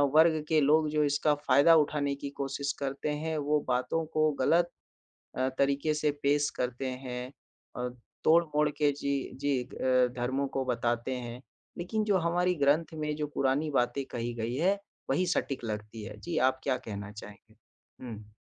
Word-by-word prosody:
वर्ग 160 -1 +5
के 160 -1 +3
लोग 155 +2 +4
जो 150 0 +2
इसका 145 +1 +2
फ़ायदा 145 +2 +5
उठाने 145 -2 +2
की 140 - -3
कोशिश 140 +1 -2
करते 140 +1 -2
हैं, 155 +2 -2
वो 150 0 +1
बातों 130 +6 0
को 155 0 +3
गलत 170 +5 +3 0.7
अ, 130 - +2
तरीक़े 140 +2 +2
से 150 0 +1
पेश 145 +1 +3
करते 125 +1 -2 0.2
हैं 125 +1 -5 0.4
अ, 125 0 -2 0.4
तोड़-मोड़ 155 -2 +4
के 150 0 +2
जी, 140 -1 -1
जी। 140 -2 0
अ, 130 0 +2
धर्मों 130 +3 0
को 135 - 0
बताते 120 0 -1
हैं। 120 0 -6 0.4
लेकिन 215 +5 -1
जो 205 -3 +3
हमारी 175 +1 +1
ग्रंथ 155 +3 +2
में 150 -1 -2
जो 150 - -2
पुरानी 140 +3 +1
बातें 130 0 +1
कही 120 0 -3
गई 115 +1 -3
है, 190 +7 +2 0.3
वही 185 - +2
सटीक 135 -7 -1
लगती 105 0 -5
है। 105 +1 -8
जी, 170 +7 -4
आप 130 0 +2
क्या 135 -2 +1
कहना 100 -1 -5
चाहेंगे? 105 +1 -12 0.5
हुँ। 105 -3 -9
140 Hz, 170 wpm, -30 LUFS, 125-155 Hz, 0.7 s, वर्ग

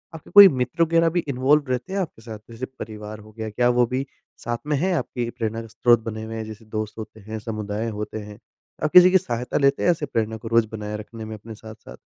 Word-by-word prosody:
आपके 160 - -12
कोई 205 -1 +11
मित्र 150 +2 0
वग़ैरह 165 0 +3
भी 175 +2 0
इन्वॉल्व 140 +2 +2
रहते 130 +10 -2
हैं 200 - 0
आपके 165 -10 -5
साथ? 110 -2 -8
जैसे 115 +3 -6
परिवार 110 -4 -9
हो 110 +1 -15
गया। 110 0 -6
क्या 120 +3 +2
वो 125 0 +3
भी 130 +3 -2 0.3
साथ 120 0 -3
में 150 - +1
है 185 +5 +1
आपकी 120 -7 -2
प्रेरणा 115 -1 -3
का 115 - -10
स्रोत 120 +1 +3
बने 110 -1 -5
हुए 110 0 -6
हैं 110 - -4
जैसे 110 0 -10
दोस्त 110 0 -5
होते 110 0 -9
हैं, 110 +2 -7
समुदाय 110 0 -4
होते 105 0 -5
हैं? 105 0 -10 0.4
आप 155 - +1
किसी 180 0 +8
की 190 - +7
सहायता 125 -8 -3
लेते 140 0 +2
हैं - - +3
ऐसे 155 -3 -2
प्रेरणा 110 -3 -2
को 115 - -9
रोज़ 115 -1 +3
बनाए 105 -1 -5
रखने 110 +1 -9
में 110 0 -6
अपने 110 +1 -10
साथ-साथ? 110 0 -12
115 Hz, 245 wpm, -23 LUFS, 110-135 Hz, 0.4 s, कोई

